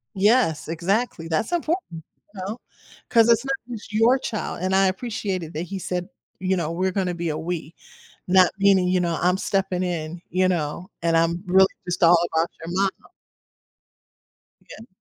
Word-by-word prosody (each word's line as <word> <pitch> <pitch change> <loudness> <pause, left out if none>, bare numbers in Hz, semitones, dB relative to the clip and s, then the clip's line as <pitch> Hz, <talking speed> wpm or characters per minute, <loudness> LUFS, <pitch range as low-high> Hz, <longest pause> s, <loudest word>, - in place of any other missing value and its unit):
Yes, 205 -6 +2
exactly, 170 +2 -1
that's 165 - -1
important, 325 - -2 0.3
you 190 - -8
know, 220 +4 -4 0.5
'cause 230 -1 +5
it's 235 +3 +4
not 270 0 0 0.2
just 210 0 -11
your 230 +5 +4
child, 215 -8 -4
and 190 +1 +1
I 195 0 +4
appreciated 190 -5 -3
that 160 +3 -3
he 190 +2 -6
said, 180 +1 -3 0.3
you 190 0 0
know, 165 -1 -2
"We're 185 +2 0
gonna 185 -2 -1
be 170 -1 -3
a 155 - -2
we," 165 -1 -5 0.5
not 185 0 +5
meaning, 195 -2 +4
you 180 0 +2
know, 170 -2 -1
"I'm 180 +1 +3
stepping 190 -3 -1
in, 170 -1 -3
you 185 +1 +2
know, 170 +2 -2
and 165 -1 +2
I'm 170 +2 +1
really 190 +1 +6 0.2
just 175 0 -3
all 170 0 +7 0.2
about 165 +1 +2 0.2
your 170 +2 -5
momma." 195 0 -1 1.5
Yeah. 225 - -13
185 Hz, 170 wpm, -23 LUFS, 170-200 Hz, 1.5 s, all